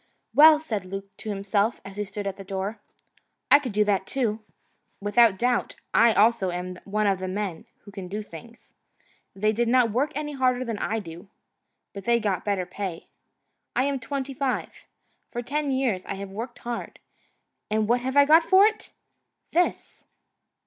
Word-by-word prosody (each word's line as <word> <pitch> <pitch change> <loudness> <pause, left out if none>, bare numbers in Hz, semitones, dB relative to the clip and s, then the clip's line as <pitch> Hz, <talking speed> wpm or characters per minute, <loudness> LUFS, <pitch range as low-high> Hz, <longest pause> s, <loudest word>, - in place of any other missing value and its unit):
"Well," 305 +1 +8
said 220 - -3
Luke, 195 +1 -8
to 220 - -7
himself, 200 +2 0
as 195 0 -9
he 210 - -2
stood 205 +1 -6
at 195 -1 -3
the 195 - -9
door, 195 +3 -4 0.7
"I 285 - +9
could 260 -5 -5
do 210 +1 +3
that 200 -2 0
too. 225 -5 -1 0.6
Without 205 0 +4
doubt 245 +2 0 0.2
I 230 +1 +6
also 215 -2 +3
am 180 +1 -5
one 210 +1 0
of 195 -2 +2
the 185 - -4
men 185 -3 -4 0.2
who 205 - -12
can 195 -2 -7
do 210 +3 -4
things. 210 +6 -13 0.6
They 215 +2 +1
did 235 +2 0
not 245 -1 +4
work 270 +7 0
any 295 0 -3
harder 255 -2 +1
than 225 -3 -4
I 220 - -1
do. 175 -2 -9 0.6
But 200 - -8
they 235 0 +3
got 205 -4 -1
better 200 -3 -1
pay. 180 -2 -6 0.7
I 250 - +3
am 280 -1 -1
twenty 270 +3 -4
five. 265 -1 -3 0.4
For 240 - -5
ten 290 +3 -2
years 250 -8 0
I - - -3
have 195 0 -7
worked 235 +5 -6
hard, 240 -1 -6 0.7
and 215 0 +1
what 240 +2 +2
have 260 +2 -2
I 285 - +8
got 315 +3 +7
for 375 +4 +6
it? 430 0 -1 0.6
This!" 355 +2 -1
215 Hz, 180 wpm, -25 LUFS, 195-255 Hz, 0.7 s, I